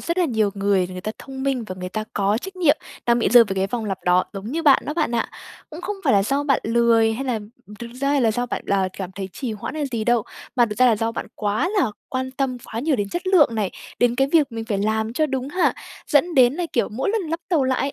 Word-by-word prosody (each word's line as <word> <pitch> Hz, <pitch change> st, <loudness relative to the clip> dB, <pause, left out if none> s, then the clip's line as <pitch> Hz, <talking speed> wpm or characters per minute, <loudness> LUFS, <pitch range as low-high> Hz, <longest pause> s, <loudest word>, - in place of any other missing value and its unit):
rất 340 Hz, +2 st, -2 dB
là 360 Hz, -, +4 dB
nhiều 220 Hz, -8 st, +1 dB
người 195 Hz, -2 st, +1 dB
người 185 Hz, 0 st, -6 dB
ta 215 Hz, +4 st, -4 dB
thông 265 Hz, -1 st, -8 dB
minh, 265 Hz, -4 st, -1 dB
và 185 Hz, -, -5 dB
người 180 Hz, -, -4 dB
ta 215 Hz, +3 st, -4 dB
có 205 Hz, +2 st, +1 dB
trách 380 Hz, +7 st, -8 dB
nhiệm 320 Hz, -4 st, +4 dB, 0.3 s
đang 235 Hz, 0 st, +4 dB
bị 235 Hz, -, +2 dB
rơi 240 Hz, -1 st, +8 dB
vào 195 Hz, -3 st, -4 dB
cái 190 Hz, 0 st, 0 dB
vòng 225 Hz, +2 st, -3 dB
lặp 195 Hz, -2 st, -3 dB
đó, 180 Hz, +1 st, +4 dB
giống 195 Hz, 0 st, -7 dB
như 330 Hz, +2 st, -1 dB
bạn 280 Hz, -4 st, +5 dB
đó 300 Hz, -, -3 dB
bạn 305 Hz, -7 st, 0 dB
ạ. 230 Hz, -, 0 dB, 0.4 s
Cũng 315 Hz, -, -8 dB
không 405 Hz, +3 st, -4 dB
phải -, -, +4 dB
là 200 Hz, -, +4 dB
do 275 Hz, +7 st, 0 dB
bạn 275 Hz, -3 st, +2 dB
lười, 230 Hz, -1 st, +3 dB
hay 260 Hz, +5 st, -4 dB
làm 220 Hz, -5 st, -3 dB, 0.3 s
thực 235 Hz, -, -7 dB
ra 275 Hz, -, +1 dB
hay 285 Hz, -1 st, +2 dB
là 230 Hz, -, +3 dB
do 245 Hz, +2 st, -1 dB
bạn -, -, -4 dB
là 195 Hz, -1 st, +1 dB
cảm 190 Hz, -2 st, -6 dB
thấy 195 Hz, 0 st, -5 dB
trì 250 Hz, +1 st, -4 dB
hoãn 215 Hz, +7 st, -6 dB
hay 305 Hz, -2 st, -2 dB
gì 220 Hz, -2 st, -1 dB
đâu, 240 Hz, -1 st, +3 dB, 0.3 s
mà 240 Hz, -, +5 dB
thực 210 Hz, 0 st, -6 dB
ra 255 Hz, -, +6 dB
là 230 Hz, -3 st, +4 dB
do 225 Hz, +2 st, -1 dB
bạn -, -, -5 dB
quá 215 Hz, +10 st, 0 dB
là 260 Hz, -, +2 dB, 0.2 s
quan 260 Hz, 0 st, -3 dB
tâm 260 Hz, -1 st, -2 dB
quá 225 Hz, -, -5 dB
nhiều 290 Hz, +1 st, +1 dB
đến 205 Hz, -3 st, -2 dB
chất 350 Hz, -, -4 dB
lượng 335 Hz, -11 st, +5 dB
này, 210 Hz, -4 st, -1 dB, 0.3 s
đến 245 Hz, -1 st, +3 dB
cái 270 Hz, +1 st, +3 dB
việc 300 Hz, -6 st, +3 dB
mình 225 Hz, 0 st, -4 dB
phải 215 Hz, -3 st, -2 dB
làm 220 Hz, +2 st, 0 dB
cho 310 Hz, +5 st, +1 dB
đúng 265 Hz, -1 st, -3 dB
hạn, 360 Hz, +5 st, +1 dB, 0.3 s
dẫn 330 Hz, +4 st, +2 dB
đến 255 Hz, -1 st, +5 dB
là 345 Hz, +1 st, -2 dB
kiểu 235 Hz, -, +1 dB
mỗi 255 Hz, -, -2 dB
lần 440 Hz, -1 st, 0 dB
lắp 330 Hz, +1 st, -2 dB
tàu 320 Hz, -7 st, +2 dB
lại 260 Hz, -1 st, +1 dB
ấy, 275 Hz, 0 st, -1 dB
240 Hz, 290 wpm, -22 LUFS, 215-280 Hz, 0.4 s, rơi